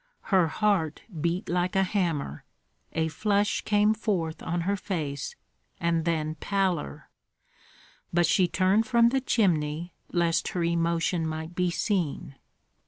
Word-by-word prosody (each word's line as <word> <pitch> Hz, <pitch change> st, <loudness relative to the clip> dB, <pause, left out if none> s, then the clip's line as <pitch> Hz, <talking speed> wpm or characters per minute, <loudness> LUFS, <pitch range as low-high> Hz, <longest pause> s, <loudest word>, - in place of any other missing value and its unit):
Her 185 Hz, -3 st, +5 dB
heart 180 Hz, -4 st, 0 dB, 0.2 s
beat 170 Hz, +4 st, -1 dB
like 180 Hz, +2 st, 0 dB
a 190 Hz, -, +4 dB
hammer; 170 Hz, -, -1 dB, 0.5 s
a 160 Hz, 0 st, 0 dB
flush 205 Hz, +5 st, +1 dB
came 210 Hz, +1 st, +3 dB
forth 185 Hz, -7 st, -2 dB
on 170 Hz, +1 st, -2 dB
her 200 Hz, +4 st, 0 dB
face, 165 Hz, -, -4 dB, 0.4 s
and 170 Hz, -1 st, +1 dB
then 155 Hz, -2 st, 0 dB
pallor; 190 Hz, -, -1 dB, 1.0 s
but 175 Hz, 0 st, +3 dB
she 185 Hz, +1 st, +3 dB
turned 190 Hz, +5 st, +2 dB
from 235 Hz, -2 st, +5 dB
the 265 Hz, +2 st, 0 dB
chimney, 170 Hz, -, 0 dB, 0.2 s
lest 170 Hz, -2 st, +1 dB
her 175 Hz, -, -2 dB
emotion 170 Hz, 0 st, +1 dB
might 160 Hz, +1 st, -5 dB
be 180 Hz, 0 st, +1 dB
seen. 170 Hz, -6 st, -1 dB
175 Hz, 130 wpm, -27 LUFS, 160-200 Hz, 1.0 s, Her